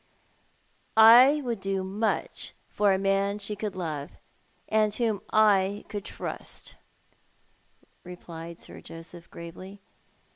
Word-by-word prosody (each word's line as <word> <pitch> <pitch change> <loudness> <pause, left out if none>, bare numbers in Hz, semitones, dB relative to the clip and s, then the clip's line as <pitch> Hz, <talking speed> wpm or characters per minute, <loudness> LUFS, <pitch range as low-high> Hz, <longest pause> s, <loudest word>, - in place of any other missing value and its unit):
'' - - -38
" - - -36
I 250 +7 +8
would 235 -4 -2
do 195 -1 -2
much 205 +4 -2
for 205 -1 +2
a 190 - +3
man 195 +1 +1
she 210 0 -3
could 210 -1 -4
love, 155 -5 -5 0.5
and 215 -1 +2
whom 225 -5 0
I 205 -2 +3
could 205 -2 -5
trust," - - -7 1.3
replied 170 -2 -9
Sir - - -11
Joseph, 165 +1 -12
gravely. 185 +4 -10
195 Hz, 120 wpm, -27 LUFS, 180-215 Hz, 1.3 s, I